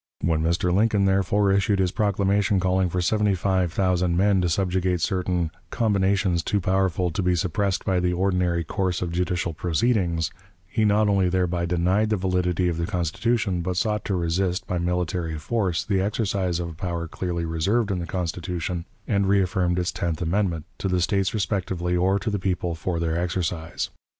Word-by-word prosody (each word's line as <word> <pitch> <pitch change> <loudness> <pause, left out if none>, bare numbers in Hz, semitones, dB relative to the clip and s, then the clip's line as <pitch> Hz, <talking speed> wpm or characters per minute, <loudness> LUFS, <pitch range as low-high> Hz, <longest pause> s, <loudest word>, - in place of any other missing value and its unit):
When 80 -2 +1
Mr. 85 +2 +1
Lincoln, 105 0 +3
therefore, 95 +1 +2
issued 100 +1 +2
his 95 -2 +1
proclamation 100 0 +1
calling 95 0 +1
for 90 +1 -1
seventy 105 +1 +2
five 95 -1 0
thousand 90 -2 +1
men 100 0 +3
to 90 - +1
subjugate 90 0 0
certain 90 -2 0 0.2
"combinations 100 -5 +1
too 100 +5 0
powerful 95 -1 +1
to 80 - -2
be 90 -1 +2
suppressed 95 +2 -1
by 95 -2 +2
the 90 0 +1
ordinary 90 -2 +1
course 90 +2 -1
of 85 - -3
judicial 90 -1 -1
proceedings," 85 -1 0 0.3
he 110 +4 0
not 105 +1 +3
only 95 -3 +2
thereby 90 -1 0
denied 90 +5 +1
the 110 - +1
validity 90 -1 0
of 85 -2 -1
the 85 - -1
Constitution, 95 +2 0
but 90 +1 -2
sought 105 +2 0
to 100 - 0
resist, 90 +1 0
by 90 - -2
military 90 -2 -1
force, 95 +2 -1
the 95 -2 +1
exercise 95 -4 -1
of 85 -1 -3
a - - -8
power 85 +1 -4
clearly 85 0 -3
reserved 100 +7 0
in 95 - -1
the 85 - -4
Constitution, 85 0 -3 0.2
and 100 -2 +1
reaffirmed 95 -2 +2
in - - +2
its 90 - -1
tenth 85 -3 -2
amendment, 85 -2 0
to 100 - -1
the 90 -1 +1
States 95 +1 +1
respectively 90 -3 -1
or 95 +3 +2
to 100 +3 -2
the 105 - -1
people 90 -2 -1
for 85 +1 -3
their 85 0 0
exercise. 85 -1 -2
90 Hz, 180 wpm, -24 LUFS, 85-100 Hz, 0.3 s, Lincoln